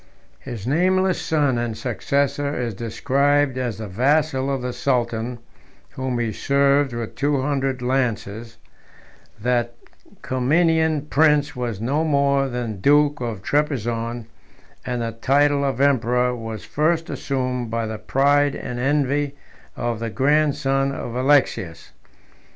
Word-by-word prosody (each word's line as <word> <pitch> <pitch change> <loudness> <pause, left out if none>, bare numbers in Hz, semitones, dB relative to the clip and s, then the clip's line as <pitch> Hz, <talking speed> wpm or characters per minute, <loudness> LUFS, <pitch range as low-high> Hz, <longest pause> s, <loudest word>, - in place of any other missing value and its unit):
His 120 -6 -7
nameless 185 +6 +2
son 145 -6 +1
and 115 -2 -3
successor 140 +4 -1
212 125 -3 -2
is - - -7
described 140 +6 +1
as 120 -4 -2
the 110 -1 -6
vassal 135 +6 +1
of 135 -2 -2
the 125 0 -3
sultan, 120 -2 -1 0.5
whom 130 -2 -3
he 115 -2 -1
served 140 +1 +2
with 120 -2 -5
two 145 0 0
hundred 135 -2 -1
lances: 115 -3 -2 0.8
that 120 +1 0 0.5
Comnenian 160 +4 +2
prince 150 -1 +3
was 120 -5 -3
no 140 +8 0
more 140 -3 +2
than 120 -5 -4
duke 145 +2 +3
of 115 -6 -4
Trebizond, 120 -5 -1 0.6
and 125 -2 -2
the 115 - -2
title 140 +5 +2
of 135 -3 -1
emperor 125 -2 +2
was 115 -4 -7
first 165 +2 0
assumed 125 -3 -2
by 115 0 -2
the 110 -1 -5
pride 140 +5 +2
and 125 -1 -5
envy 145 +1 0 0.4
of 120 -2 -2
the 115 0 -3
grandson 140 +1 +1
of 120 -3 -5
Alexius. 130 - +1
130 Hz, 130 wpm, -22 LUFS, 120-145 Hz, 0.8 s, prince